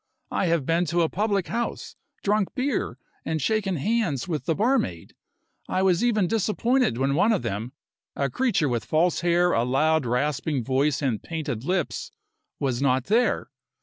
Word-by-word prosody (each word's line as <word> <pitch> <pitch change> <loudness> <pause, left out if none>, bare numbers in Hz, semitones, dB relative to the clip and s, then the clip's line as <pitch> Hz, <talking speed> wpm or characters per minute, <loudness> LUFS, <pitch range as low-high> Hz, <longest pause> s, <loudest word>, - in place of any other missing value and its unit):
I 185 - 0
have 165 -5 +1
been 165 +3 +2
to 170 +1 +1
a 160 - +1
public 200 -2 0
house, 235 +1 -3 0.3
drunk 210 +2 +1
beer, 275 +1 -1 0.3
and 160 -1 -2
shaken 195 +4 0
hands 165 - 0
with 155 -4 -3
the 165 - +1
barmaid. 220 - 0 0.6
I 185 - +1
was 190 +2 +3
even 215 -5 +2
disappointed 225 - +1
when 135 +2 +1
one 200 +10 +3
of 210 - 0
them 110 +6 -4 0.4
a 140 - 0
creature 200 - +1
with 120 -4 -1
false 165 +8 +1
hair, 175 +1 +3
a 115 - +2
loud, 145 +3 +2
rasping 135 +2 0
voice 135 +3 +1
and 120 -7 0
painted 150 -8 -4
lips 180 -2 -1 0.5
was 130 -3 -1
not 130 -2 +2
there. 230 - +1
165 Hz, 165 wpm, -25 LUFS, 135-205 Hz, 0.6 s, was